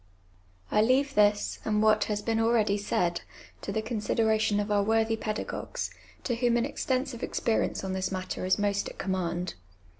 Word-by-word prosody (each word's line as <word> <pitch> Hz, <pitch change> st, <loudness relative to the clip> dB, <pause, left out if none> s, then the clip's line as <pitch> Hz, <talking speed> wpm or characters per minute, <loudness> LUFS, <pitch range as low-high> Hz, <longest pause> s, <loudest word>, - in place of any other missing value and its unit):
I 210 Hz, -, +4 dB
leave 265 Hz, +5 st, +3 dB
this, 205 Hz, -2 st, +2 dB
and 215 Hz, -1 st, +1 dB
what 215 Hz, 0 st, +4 dB
has 210 Hz, -1 st, -2 dB
been 225 Hz, 0 st, 0 dB
ah'eady 225 Hz, -3 st, +3 dB
said, 175 Hz, -3 st, 0 dB, 0.4 s
to -, -, -4 dB
the 220 Hz, +2 st, -1 dB
consideration 220 Hz, -1 st, +1 dB
of 205 Hz, +1 st, -2 dB
our 205 Hz, -1 st, +3 dB
worthy 225 Hz, +2 st, +2 dB
pedagogues, 215 Hz, -1 st, -4 dB, 0.3 s
to 245 Hz, -, -1 dB
whom 240 Hz, 0 st, +2 dB
an 235 Hz, -, +1 dB
extensive 260 Hz, -3 st, -2 dB
experience 225 Hz, -3 st, 0 dB
on 190 Hz, -1 st, -3 dB
this 190 Hz, 0 st, -2 dB
matter 185 Hz, -1 st, -4 dB
is 185 Hz, +1 st, +2 dB
most 205 Hz, -1 st, 0 dB
at -, -, -13 dB
command. 180 Hz, -2 st, -2 dB
215 Hz, 170 wpm, -28 LUFS, 200-225 Hz, 0.4 s, I